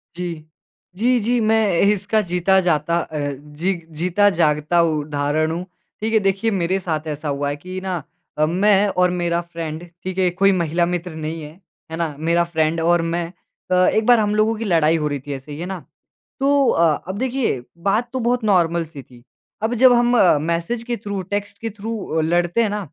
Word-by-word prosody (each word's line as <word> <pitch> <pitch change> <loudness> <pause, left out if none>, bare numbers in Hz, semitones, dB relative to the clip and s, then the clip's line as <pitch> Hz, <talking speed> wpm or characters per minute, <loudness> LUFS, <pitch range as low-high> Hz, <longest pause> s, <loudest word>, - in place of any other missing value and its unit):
जी। 170 -3 -5 0.5
जी, 245 +4 +3
जी, 240 +3 +1
मैं 215 -5 +2
इसका 205 +2 +2
जीता 185 +2 +3
जाता 170 -1 +1
अ, 155 -2 -5
जी 150 +6 -3 0.2
जीता 185 +5 +3
जागता 155 +1 +2
उदाहरण 155 0 0
हूँ। 175 +2 -4 0.4
ठीक 225 +1 -1
है, 220 - +5
देखिए 195 +3 0
मेरे 190 0 0
साथ 160 -3 -3
ऐसा 150 0 -4
हुआ 140 0 -1
है 145 - -2
कि 185 +5 -7
ना 185 -3 -3 0.4
अ, 155 - +3
मैं 195 +4 +3
और 180 -2 +2
मेरा 175 -1 0
फ़्रेड, 165 -2 -6 0.2
ठीक 185 0 -5
है, 190 - +2
ये 180 - +3
कोई 195 +2 +3
महिला 170 -2 +1
मित्र 175 0 -3
नहीं 160 +1 -5
है, 150 - -8 0.4
है 160 - -4
ना? 160 -4 -2
मेरा 170 +2 +2
फ़्रेड 165 -1 0
और 175 +1 +3
मैं। 170 +1 -1 0.5
अ, - - +4
एक 220 0 +2
बार 245 -2 +6
हम 210 -1 +1
लोगों 220 +1 +2
की 225 +1 -5
लड़ाई 165 -3 +3
हो 150 - -1
रही 145 -1 -3
थी 145 - -3
ऐसे 135 +2 -8
ही, 145 - -7
है 175 - -4
ना? 190 -1 -5 0.6
तो 280 0 +3
अ 165 -3 +2
अब 190 +2 -4
देखिए, 250 - -1
बात 210 +7 0
तो 260 - -1
बहुत 245 0 0
नॉर्मल 170 -5 +2
सी 150 -3 -10
थी। 120 -2 -18 0.4
अब 225 +2 +1
जब 250 +1 +6
हम 240 0 +3 0.3
मैसेज 170 +8 -2
के 240 0 -3
थ्रू, 200 -2 -4
टेक्स्ट 205 +2 -4
के 225 - -3
थ्रू 220 +2 -5
अ, 160 - 0
लड़ते 175 +6 +1
हैं 220 - 0
ना 210 +1 -2
175 Hz, 205 wpm, -21 LUFS, 160-205 Hz, 0.6 s, बार